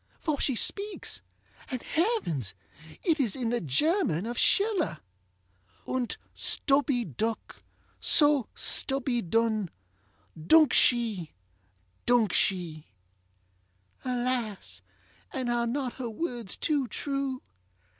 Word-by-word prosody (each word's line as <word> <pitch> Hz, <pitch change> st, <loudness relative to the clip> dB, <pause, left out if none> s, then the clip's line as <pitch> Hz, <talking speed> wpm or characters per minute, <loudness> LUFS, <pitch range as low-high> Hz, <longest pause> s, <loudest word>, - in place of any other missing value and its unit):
for 305 Hz, -4 st, -2 dB
she 265 Hz, -, +2 dB
speaks, 400 Hz, -, -2 dB, 0.5 s
and, 255 Hz, -2 st, -4 dB
heavens! 310 Hz, -, -1 dB, 0.5 s
it 330 Hz, -4 st, +2 dB
is 235 Hz, -8 st, +2 dB
in 245 Hz, -3 st, -2 dB
the 240 Hz, -, 0 dB
German 180 Hz, -, +1 dB
of 240 Hz, +1 st, -4 dB
SchillerŌĆö 390 Hz, -, +2 dB, 0.9 s
ŌĆ£Unt 255 Hz, -2 st, -2 dB, 0.2 s
stubby 275 Hz, -3 st, +2 dB
duk, 220 Hz, -, -4 dB, 0.4 s
so 290 Hz, -5 st, +4 dB
stubby 265 Hz, -3 st, +1 dB
dun 215 Hz, 0 st, 0 dB, 0.8 s
Duk 310 Hz, -, +6 dB
she! 220 Hz, -10 st, +2 dB, 0.7 s
duk 235 Hz, -6 st, +3 dB
she! 170 Hz, -5 st, -1 dB, 1.2 s
ŌĆØ -, -, -24 dB
Alas! 240 Hz, -, -2 dB, 0.5 s
and 255 Hz, -2 st, -2 dB
are 235 Hz, 0 st, 0 dB
not 255 Hz, 0 st, -2 dB
her 250 Hz, -3 st, -5 dB
words 235 Hz, -, -4 dB
too 290 Hz, -5 st, 0 dB
true? 275 Hz, +2 st, -3 dB
245 Hz, 105 wpm, -28 LUFS, 215-280 Hz, 1.2 s, Duk